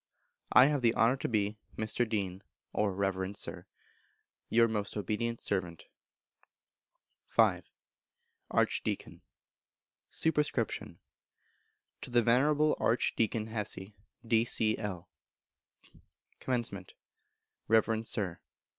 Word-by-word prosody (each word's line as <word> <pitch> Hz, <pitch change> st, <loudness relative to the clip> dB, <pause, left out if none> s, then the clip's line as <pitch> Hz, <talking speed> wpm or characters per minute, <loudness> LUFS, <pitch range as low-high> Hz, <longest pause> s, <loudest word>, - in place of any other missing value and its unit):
_ -, -, -62 dB, 0.5 s
I 125 Hz, -, +8 dB
have 145 Hz, -1 st, +1 dB
the 115 Hz, -1 st, +3 dB
honour 115 Hz, +3 st, +4 dB
to -, -, -3 dB
be, 105 Hz, -1 st, -1 dB, 0.2 s
Mr. 110 Hz, +2 st, 0 dB
Dean 95 Hz, -3 st, -2 dB, 0.3 s
(or 105 Hz, -2 st, +1 dB
Reverend 95 Hz, 0 st, -2 dB
Sir), -, -, -4 dB, 0.8 s
Your 115 Hz, 0 st, +5 dB
most 105 Hz, -2 st, -3 dB
obedient 115 Hz, +3 st, -2 dB
servant. 85 Hz, -4 st, -3 dB, 1.5 s
v. -, -, +4 dB, 0.9 s
Archdeacon. -, -, -1 dB, 0.9 s
Sup. 160 Hz, -, +1 dB
To 145 Hz, -3 st, -6 dB
the 120 Hz, -1 st, +3 dB
Venerable 145 Hz, +6 st, +3 dB
Archdeacon 115 Hz, -2 st, +1 dB
Hessey, 105 Hz, -2 st, -3 dB, 0.3 s
D.C.L. 110 Hz, -5 st, +1 dB, 1.3 s
Comm. 115 Hz, -7 st, -2 dB, 0.8 s
Reverend 110 Hz, 0 st, +2 dB
Sir. 90 Hz, -6 st, -2 dB
110 Hz, 90 wpm, -31 LUFS, 100-120 Hz, 1.5 s, I